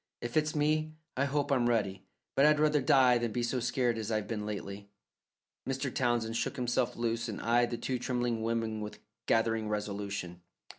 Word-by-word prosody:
"If 120 Hz, 0 st, -5 dB
it's 155 Hz, 0 st, +2 dB
me, 155 Hz, +1 st, +1 dB, 0.2 s
I 135 Hz, -, +1 dB
hope 145 Hz, +1 st, 0 dB
I'm 125 Hz, -3 st, +3 dB
ready; 100 Hz, -5 st, 0 dB, 0.3 s
but 135 Hz, -, +3 dB
I'd 150 Hz, 0 st, +5 dB
rather 150 Hz, -1 st, +3 dB
die 125 Hz, -2 st, +5 dB
than 120 Hz, -1 st, -1 dB
be 120 Hz, +2 st, -1 dB
so 120 Hz, +2 st, 0 dB
scared 120 Hz, -1 st, 0 dB
as 110 Hz, -1 st, -4 dB
I've 110 Hz, -2 st, -1 dB
been 105 Hz, -2 st, -3 dB
lately." 100 Hz, -1 st, -6 dB, 0.8 s
Mr. 135 Hz, 0 st, -2 dB
Townsend 120 Hz, -3 st, 0 dB
shook -, -, -1 dB
himself 125 Hz, 0 st, 0 dB
loose 115 Hz, 0 st, -1 dB
and 105 Hz, -, -4 dB
eyed 120 Hz, +1 st, +2 dB
the 120 Hz, -, -3 dB
two 125 Hz, +2 st, -2 dB
trembling 120 Hz, -2 st, -1 dB
women 115 Hz, -1 st, -1 dB
with 105 Hz, 0 st, -6 dB, 0.3 s
gathering 115 Hz, -1 st, +2 dB
resolution. 100 Hz, -4 st, -4 dB
120 Hz, 185 wpm, -31 LUFS, 110-130 Hz, 0.8 s, I'd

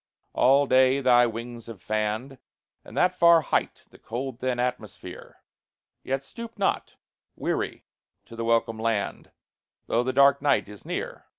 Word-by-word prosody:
All 140 Hz, +3 st, +4 dB
day 130 Hz, 0 st, +4 dB
thy 120 Hz, -2 st, +5 dB
wings 115 Hz, 0 st, -7 dB
have 115 Hz, -4 st, -9 dB
fanned, 110 Hz, +6 st, -3 dB, 0.4 s
At -, -, -13 dB
that 180 Hz, 0 st, +3 dB
far 170 Hz, -2 st, +5 dB
height, -, -, -2 dB
the -, -, -18 dB
cold 120 Hz, +2 st, -6 dB
thin 130 Hz, -1 st, -2 dB
atmosphere, 125 Hz, 0 st, -6 dB, 0.6 s
Yet 135 Hz, +1 st, -2 dB
stoop 230 Hz, -, -10 dB
not, 200 Hz, -, -1 dB, 0.4 s
weary, -, -, -3 dB, 0.4 s
to 115 Hz, -, -12 dB
the 115 Hz, -, -4 dB
welcome 115 Hz, -1 st, +1 dB
land, 110 Hz, -2 st, -2 dB, 0.6 s
Though 115 Hz, -, +1 dB
the 130 Hz, +1 st, -1 dB
dark 140 Hz, +1 st, +4 dB
night 140 Hz, -6 st, +2 dB
is 105 Hz, -2 st, -13 dB
near. -, -, -5 dB
125 Hz, 150 wpm, -26 LUFS, 115-140 Hz, 0.6 s, thy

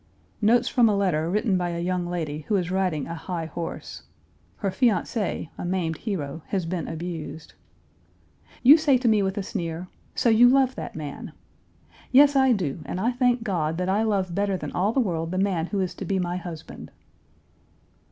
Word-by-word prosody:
Notes 235 Hz, +3 st, +4 dB
from 240 Hz, -3 st, +4 dB
a 210 Hz, -, +2 dB
letter 170 Hz, -5 st, +1 dB
written 205 Hz, 0 st, +1 dB
by 175 Hz, -1 st, -1 dB
a 170 Hz, 0 st, -3 dB
young 180 Hz, 0 st, -1 dB
lady 160 Hz, -4 st, -3 dB
who 210 Hz, -, +1 dB
is 180 Hz, -2 st, -1 dB
riding 185 Hz, -6 st, 0 dB
a 165 Hz, -, -6 dB
high 165 Hz, 0 st, -4 dB
horse. 165 Hz, +1 st, -6 dB, 0.5 s
Her 200 Hz, -3 st, -2 dB
fiancé, 205 Hz, -, 0 dB
a -, -, -4 dB
maimed 175 Hz, -3 st, -1 dB
hero, 160 Hz, -8 st, -4 dB
has 190 Hz, -4 st, -1 dB
been 170 Hz, 0 st, -3 dB
abused. 160 Hz, -2 st, -6 dB, 1.1 s
"You 280 Hz, +6 st, +9 dB
say 295 Hz, -4 st, +3 dB
to 250 Hz, -1 st, -1 dB
me 215 Hz, -2 st, +4 dB
with 190 Hz, 0 st, -1 dB
a 200 Hz, -, -1 dB
sneer, 175 Hz, -3 st, -4 dB, 0.3 s
'So 250 Hz, -, +2 dB
you 235 Hz, +2 st, +7 dB
love 265 Hz, 0 st, +3 dB
that -, -, -7 dB
man.' 150 Hz, -3 st, -7 dB, 0.8 s
Yes, 285 Hz, +2 st, +6 dB
I 265 Hz, -1 st, +5 dB
do, 175 Hz, -, -1 dB
and 180 Hz, -, -4 dB
I 230 Hz, +5 st, +1 dB
thank 245 Hz, -1 st, +1 dB
God 165 Hz, -7 st, -1 dB
that 180 Hz, +1 st, -1 dB
I 200 Hz, +3 st, +2 dB
love 195 Hz, -5 st, 0 dB
better 200 Hz, 0 st, 0 dB
than -, -, -6 dB
all 195 Hz, +4 st, +1 dB
the 265 Hz, -, +1 dB
world 165 Hz, -8 st, -1 dB
the 185 Hz, -, -3 dB
man 185 Hz, -4 st, 0 dB
who 200 Hz, -, -2 dB
is 185 Hz, -1 st, -2 dB
to -, -, -7 dB
be 195 Hz, -, 0 dB
my 180 Hz, -1 st, -1 dB
husband. 170 Hz, -3 st, -8 dB
185 Hz, 190 wpm, -25 LUFS, 170-220 Hz, 1.1 s, You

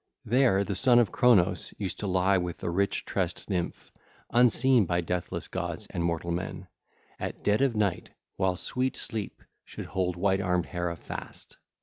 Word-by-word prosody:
There 120 Hz, -4 st, +3 dB
the 100 Hz, -, -3 dB
son 120 Hz, +6 st, +6 dB
of 120 Hz, -6 st, +4 dB
Cronos 95 Hz, -8 st, +3 dB
used 95 Hz, -4 st, -4 dB
to 105 Hz, -, -3 dB
lie 95 Hz, +1 st, +3 dB
with 90 Hz, -1 st, -4 dB
the -, -, -3 dB
rich 100 Hz, +3 st, 0 dB
tressed 90 Hz, -3 st, -2 dB
nymph, 90 Hz, -3 st, -3 dB, 0.4 s
unseen 125 Hz, -2 st, +4 dB
by 85 Hz, 0 st, +1 dB
deathless 90 Hz, +1 st, -3 dB
gods 85 Hz, +1 st, -4 dB
and 85 Hz, -3 st, -2 dB
mortal 85 Hz, 0 st, -1 dB
men, 85 Hz, +1 st, -4 dB, 0.5 s
at -, -, -5 dB
dead 105 Hz, +4 st, +2 dB
of 135 Hz, -4 st, +2 dB
night 100 Hz, -4 st, 0 dB, 0.3 s
while 95 Hz, -1 st, +1 dB
sweet 125 Hz, +8 st, -1 dB
sleep 110 Hz, -4 st, -4 dB, 0.2 s
should -, -, -8 dB
hold 90 Hz, -2 st, -1 dB
white 95 Hz, +2 st, +1 dB
armed 90 Hz, -2 st, 0 dB
Hera 85 Hz, -1 st, -3 dB
fast. -, -, -8 dB
95 Hz, 165 wpm, -28 LUFS, 90-110 Hz, 0.5 s, son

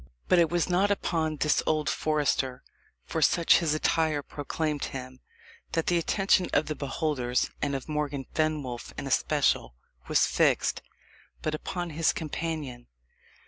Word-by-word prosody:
But 180 Hz, -, +5 dB
it 165 Hz, -2 st, +4 dB
was 175 Hz, -1 st, +1 dB
not 185 Hz, +3 st, +2 dB
upon 165 Hz, -6 st, 0 dB
this 150 Hz, 0 st, +2 dB
old 155 Hz, -1 st, +1 dB
forester, 145 Hz, -5 st, 0 dB, 0.4 s
for -, -, -3 dB
such 170 Hz, -1 st, +5 dB
his 155 Hz, -3 st, +1 dB
attire 155 Hz, -1 st, +1 dB
proclaimed 150 Hz, +1 st, -3 dB
him, 130 Hz, -1 st, -7 dB, 0.5 s
that 165 Hz, -, +1 dB
the 175 Hz, -1 st, +2 dB
attention 190 Hz, +1 st, +2 dB
of 145 Hz, -, +3 dB
the 155 Hz, -, -2 dB
beholders, 140 Hz, -4 st, -1 dB
and 140 Hz, -1 st, 0 dB
of 135 Hz, -, -5 dB
Morgan 150 Hz, -3 st, -2 dB
Fenwolf 150 Hz, -6 st, -2 dB
in -, -, -4 dB
especial, -, -, +1 dB, 0.3 s
was -, -, +4 dB
fixed, -, -, +2 dB, 0.6 s
but 155 Hz, -, -1 dB
upon 175 Hz, +2 st, -4 dB
his 160 Hz, +2 st, +2 dB
companion. 155 Hz, -6 st, -4 dB
155 Hz, 140 wpm, -28 LUFS, 140-165 Hz, 0.6 s, But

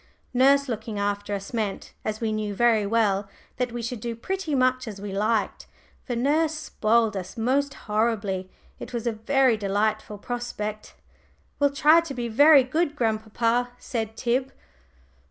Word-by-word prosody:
Nurse 275 Hz, +3 st, +4 dB
looking 220 Hz, -2 st, -4 dB
after 205 Hz, 0 st, -2 dB
us 200 Hz, +3 st, -7 dB
meant, 215 Hz, -4 st, -3 dB
as 215 Hz, 0 st, -3 dB
we 225 Hz, -2 st, -1 dB
knew 215 Hz, -1 st, -2 dB
very 225 Hz, -2 st, +3 dB
well, 205 Hz, -3 st, +1 dB, 0.3 s
that 250 Hz, -1 st, -1 dB
we 240 Hz, 0 st, -5 dB
should 235 Hz, 0 st, -4 dB
do 235 Hz, +1 st, -4 dB
pretty 355 Hz, +4 st, -3 dB
much 255 Hz, -1 st, +2 dB
as 205 Hz, -3 st, -7 dB
we 205 Hz, 0 st, -6 dB
liked; 215 Hz, +1 st, -1 dB, 0.3 s
for 245 Hz, -, -4 dB
nurse 305 Hz, +6 st, +1 dB
spoiled 225 Hz, -7 st, +1 dB
us 185 Hz, +2 st, -6 dB
most 270 Hz, +5 st, 0 dB
horribly. 210 Hz, -4 st, -1 dB, 0.3 s
It -, -, -8 dB
was 235 Hz, -1 st, -3 dB
a 235 Hz, -, +1 dB
very 250 Hz, +2 st, +2 dB
delightful 210 Hz, +1 st, -1 dB
prospect. 215 Hz, -2 st, -5 dB, 0.6 s
"We'll 285 Hz, -1 st, +4 dB
try 300 Hz, +4 st, +5 dB
to 315 Hz, -5 st, -7 dB
be 240 Hz, -1 st, -3 dB
very 285 Hz, +4 st, +7 dB
good, 300 Hz, +4 st, -1 dB
grandpapa," 230 Hz, +1 st, 0 dB
said 225 Hz, -3 st, -4 dB
Tib. 255 Hz, +2 st, 0 dB
230 Hz, 155 wpm, -25 LUFS, 215-260 Hz, 0.6 s, very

